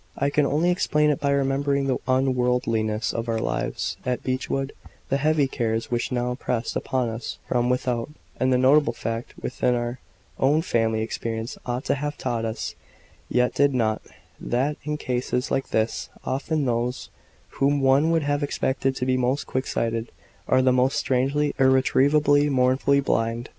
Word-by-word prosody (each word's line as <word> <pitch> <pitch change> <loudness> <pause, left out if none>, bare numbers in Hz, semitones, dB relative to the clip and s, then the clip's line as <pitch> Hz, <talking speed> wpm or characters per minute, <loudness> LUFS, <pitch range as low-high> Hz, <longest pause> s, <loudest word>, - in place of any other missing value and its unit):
I 140 +1 +1
can 145 -1 +2
only 160 +6 +2
explain 150 -4 +2
it 145 - -1
by 140 - 0
remembering 140 0 +1
the 130 -2 0
unworldliness 125 -4 +1
of 115 0 -3
our 115 - +1
lives - - -2
at 125 -1 -2
Beechwood, 135 +1 -2 0.4
the 135 - +2
heavy 150 0 +2
cares 115 -3 -2
which 120 +1 -1
now 125 0 0
pressed 125 -2 -3
upon 125 -3 -1
us 115 +1 -5
from 120 0 +1
without, 125 -1 -1 0.3
and 130 0 +2
the 125 - +4
notable 140 +4 +4
fact 115 +1 -5
which - - -6
our 120 0 +1 0.4
own 150 +4 +3
family 110 -7 +1
experience 115 0 -4
ought 125 +2 -2
to - - +2
have 145 +1 -3
taught 120 -3 -2
us, 110 0 -4 0.6
yet 125 0 +2
did 140 -1 +3
not 110 -3 +1 0.4
that 135 +5 0
in 150 0 -2
cases 125 -1 -2
like 135 - -1
this, 110 +1 -1 0.2
often 145 +2 -1
those 120 +1 -2 0.5
whom 140 +1 +3
one 135 +4 +4
would 165 -2 +2
have 145 +1 0
expected 135 -1 -1
to 125 - -2
be 130 0 +2
most 130 +3 0
quick 130 +1 -2
sighted, 115 0 -2 0.4
are 130 - +3
the 130 - +4
most 130 +1 +2
strangely, 140 +3 +1
irretrievably, 145 +2 +4
mournfully 135 +1 +3
blind. 115 -2 -1
130 Hz, 165 wpm, -24 LUFS, 120-140 Hz, 0.6 s, the